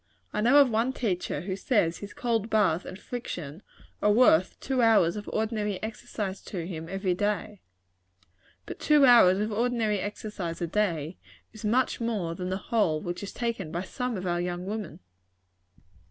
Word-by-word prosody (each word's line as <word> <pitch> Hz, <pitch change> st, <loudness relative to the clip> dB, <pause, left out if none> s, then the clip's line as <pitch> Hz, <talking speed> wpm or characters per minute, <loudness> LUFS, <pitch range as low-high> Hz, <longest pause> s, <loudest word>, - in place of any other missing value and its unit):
I 210 Hz, -, 0 dB
know 245 Hz, +6 st, +5 dB
of 280 Hz, -4 st, +6 dB
one 230 Hz, +4 st, +1 dB
teacher 180 Hz, -, -2 dB
who 185 Hz, +2 st, -3 dB
says 195 Hz, -5 st, +1 dB
his 205 Hz, 0 st, -8 dB
cold 230 Hz, -3 st, -1 dB
bath 190 Hz, -6 st, +2 dB
and -, -, -7 dB
friction 175 Hz, -, -6 dB, 0.4 s
are 210 Hz, -, +4 dB
worth 205 Hz, -6 st, +4 dB
two 260 Hz, -2 st, 0 dB
hours 215 Hz, -7 st, +4 dB
of 210 Hz, -1 st, -6 dB
ordinary 215 Hz, -2 st, -1 dB
exercise 210 Hz, -3 st, -5 dB
to 175 Hz, -4 st, -5 dB
him 165 Hz, -2 st, -6 dB
every 195 Hz, -1 st, -1 dB
day. 205 Hz, +1 st, -2 dB, 1.0 s
But -, -, -8 dB
two 300 Hz, -2 st, +5 dB
hours 230 Hz, -7 st, +7 dB
of 210 Hz, +2 st, -1 dB
ordinary 225 Hz, -2 st, 0 dB
exercise 200 Hz, -4 st, -5 dB
a 175 Hz, -, -1 dB
day, 170 Hz, -4 st, -1 dB, 0.3 s
is 220 Hz, -, -11 dB
much 240 Hz, +4 st, +1 dB
more 210 Hz, -8 st, -1 dB
than 180 Hz, +1 st, -5 dB
the 190 Hz, -, -1 dB
whole 195 Hz, -7 st, +1 dB
which 175 Hz, +2 st, -5 dB
is 200 Hz, -, -6 dB
taken 230 Hz, -9 st, -3 dB
by 175 Hz, +2 st, -3 dB
some 250 Hz, +3 st, -3 dB
of 185 Hz, -, -5 dB
our 175 Hz, -1 st, 0 dB
young 175 Hz, 0 st, -3 dB
women. 210 Hz, -3 st, -5 dB
205 Hz, 170 wpm, -27 LUFS, 180-225 Hz, 1.0 s, hours